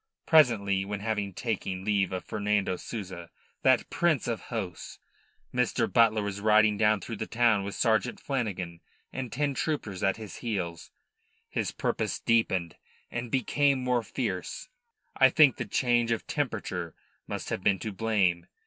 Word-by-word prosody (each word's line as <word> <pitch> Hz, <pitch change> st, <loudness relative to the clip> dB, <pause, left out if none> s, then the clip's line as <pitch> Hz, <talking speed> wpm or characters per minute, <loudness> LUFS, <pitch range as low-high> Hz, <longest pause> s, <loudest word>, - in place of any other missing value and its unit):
Presently, 105 Hz, -11 st, +4 dB
when 100 Hz, +1 st, -5 dB
having 105 Hz, -2 st, -2 dB
taken 95 Hz, -3 st, -3 dB
leave 100 Hz, -3 st, +1 dB
of 95 Hz, -1 st, -4 dB
Fernando 105 Hz, -3 st, 0 dB
Souza 90 Hz, -5 st, -7 dB, 0.3 s
that -, -, +4 dB
prince 165 Hz, -8 st, +1 dB
of 115 Hz, -2 st, -2 dB
hosts 100 Hz, -8 st, -5 dB, 0.6 s
Mr. 125 Hz, -1 st, +1 dB
Butler 110 Hz, -3 st, +4 dB
was 100 Hz, 0 st, -4 dB
riding 110 Hz, 0 st, +5 dB
down 105 Hz, -1 st, +3 dB
through 115 Hz, -, -6 dB
the 110 Hz, -, -4 dB
town 115 Hz, -4 st, +3 dB
with 100 Hz, 0 st, -5 dB
Sergeant 115 Hz, +1 st, +1 dB
Flanagan 95 Hz, -11 st, -3 dB, 0.3 s
and 130 Hz, -3 st, -4 dB
ten 145 Hz, 0 st, 0 dB
troopers 130 Hz, -, -2 dB
at 95 Hz, -1 st, +1 dB
his 110 Hz, -3 st, -8 dB
heels, 90 Hz, -8 st, -4 dB, 0.6 s
his -, -, -1 dB
purpose -, -, -2 dB
deepened 95 Hz, -7 st, +1 dB, 0.3 s
and 120 Hz, 0 st, -4 dB
became 135 Hz, +2 st, +2 dB
more 125 Hz, -1 st, +2 dB
fierce. -, -, -4 dB, 0.5 s
I 135 Hz, -1 st, +6 dB
think 140 Hz, -2 st, +5 dB
the -, -, -3 dB
change 120 Hz, -2 st, +1 dB
of 115 Hz, -, -1 dB
temperature 100 Hz, -, -3 dB, 0.3 s
must -, -, -5 dB
have -, -, -2 dB
been 95 Hz, +1 st, +3 dB
to 110 Hz, -, -5 dB
blame. 95 Hz, -4 st, +1 dB
110 Hz, 150 wpm, -28 LUFS, 95-120 Hz, 0.6 s, I